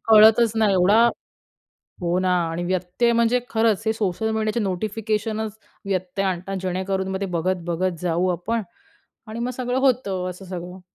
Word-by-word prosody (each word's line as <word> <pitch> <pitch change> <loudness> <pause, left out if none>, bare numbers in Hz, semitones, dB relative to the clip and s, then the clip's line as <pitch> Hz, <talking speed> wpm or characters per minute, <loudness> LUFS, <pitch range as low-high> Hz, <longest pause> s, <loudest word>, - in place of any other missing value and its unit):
कळतच 220 +1 +7
नाही. 215 -2 +3
एवढा 200 +5 +5 1.0
हो 175 +1 +1
ना 185 - +1 0.2
आणि 165 +2 -3
व्यत्यय 185 +6 0
म्हणजे 235 +1 +3
खरंच, 220 -2 +2
हे 220 - +3
सोशल 220 0 -1
मीडियाचे 220 +1 0
नोटिफिकेशनच 215 +2 -2 0.3
व्यत्यय 185 0 -2
आणतात. 185 +1 -3
जेणेकरून 190 +1 -2
मग 190 0 -3
ते 195 - -1
बघत-बघत 175 0 -1
जाऊ 180 +1 +1
आपण 220 +6 -2 0.7
आणि 220 +2 -6
मग 240 +1 -1
सगळं 255 0 -1
होतं. 200 -9 +1
असं 180 +2 -9
सगळं. 180 0 -7
195 Hz, 150 wpm, -23 LUFS, 180-220 Hz, 1.0 s, कळतच